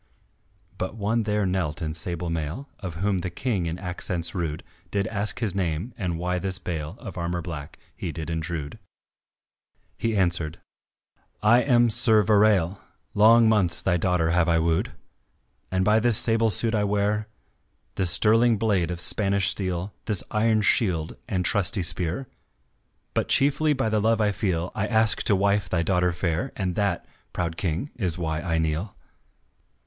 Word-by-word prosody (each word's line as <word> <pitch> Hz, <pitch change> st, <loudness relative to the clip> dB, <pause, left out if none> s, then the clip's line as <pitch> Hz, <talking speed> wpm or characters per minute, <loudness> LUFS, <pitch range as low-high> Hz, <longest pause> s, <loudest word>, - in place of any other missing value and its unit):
But 95 Hz, +3 st, -4 dB
one 110 Hz, +2 st, 0 dB
there 105 Hz, -1 st, +1 dB
knelt 90 Hz, -5 st, -2 dB
in 80 Hz, -2 st, -3 dB
sable 85 Hz, +1 st, -2 dB
mail 80 Hz, -, -4 dB
Of 90 Hz, -4 st, -6 dB
whom 95 Hz, +2 st, 0 dB
the 90 Hz, -, -4 dB
King 95 Hz, -1 st, -2 dB
in 85 Hz, +1 st, -4 dB
accents 90 Hz, -2 st, -2 dB
rude, 80 Hz, -5 st, -4 dB, 0.3 s
Did 100 Hz, -1 st, -1 dB
ask 105 Hz, +1 st, -1 dB
his 105 Hz, -6 st, 0 dB
name, 90 Hz, +4 st, -3 dB
and 90 Hz, -5 st, -3 dB
why 90 Hz, +1 st, -2 dB
this 95 Hz, 0 st, -2 dB
bale 80 Hz, -2 st, -5 dB
Of 100 Hz, -6 st, -8 dB
armour 85 Hz, 0 st, -3 dB
black, 75 Hz, -5 st, -8 dB, 0.2 s
he -, -, -5 dB
did 80 Hz, 0 st, -6 dB
intrude; 80 Hz, +2 st, -4 dB, 1.2 s
He 115 Hz, -2 st, -1 dB
answered: 85 Hz, -4 st, -1 dB, 0.8 s
"I 120 Hz, +3 st, +5 dB
am 120 Hz, -3 st, +3 dB
Sir 110 Hz, -1 st, +4 dB
Verale, 100 Hz, -3 st, +3 dB, 0.3 s
Long 115 Hz, +2 st, +6 dB
months 100 Hz, -6 st, +2 dB
thy 95 Hz, -, +1 dB
daughter 90 Hz, -2 st, +1 dB
have 90 Hz, -1 st, +2 dB
I 85 Hz, -, +3 dB
wooed. 80 Hz, 0 st, 0 dB, 0.8 s
And 95 Hz, 0 st, 0 dB
by 105 Hz, +2 st, +4 dB
this 115 Hz, -1 st, +4 dB
sable 115 Hz, -1 st, +5 dB
suit 110 Hz, +3 st, +2 dB
I 105 Hz, -2 st, +1 dB
wear, 105 Hz, +1 st, 0 dB, 0.7 s
This 95 Hz, -3 st, 0 dB
sterling 115 Hz, +5 st, +4 dB
blade 100 Hz, -6 st, 0 dB
of 90 Hz, -1 st, -4 dB
Spanish 100 Hz, +1 st, +2 dB
steel, 95 Hz, 0 st, -2 dB
This 100 Hz, -8 st, +4 dB
iron 110 Hz, 0 st, +2 dB
shield 90 Hz, -9 st, +1 dB
and 90 Hz, -3 st, -1 dB
trusty 100 Hz, 0 st, +2 dB
spear, 90 Hz, +8 st, 0 dB, 0.9 s
But -, -, -1 dB
chiefly 145 Hz, +2 st, +3 dB
by 130 Hz, -5 st, -1 dB
the 110 Hz, -1 st, 0 dB
love 115 Hz, +1 st, +2 dB
I 105 Hz, -1 st, +2 dB
feel, 90 Hz, -4 st, -2 dB
I 105 Hz, 0 st, -2 dB
ask 110 Hz, -1 st, +4 dB
to 100 Hz, -, +3 dB
wife 100 Hz, -1 st, +1 dB
thy 85 Hz, -1 st, 0 dB
daughter 90 Hz, 0 st, +1 dB
fair 85 Hz, +7 st, -2 dB
And 95 Hz, -3 st, -2 dB
that, 100 Hz, -2 st, -1 dB, 0.3 s
proud 85 Hz, -2 st, -3 dB
King, 85 Hz, -, -3 dB
is 90 Hz, -7 st, -2 dB
why 80 Hz, -2 st, -3 dB
I 85 Hz, -2 st, -1 dB
kneel." 80 Hz, +5 st, -2 dB
95 Hz, 165 wpm, -25 LUFS, 85-105 Hz, 1.2 s, Long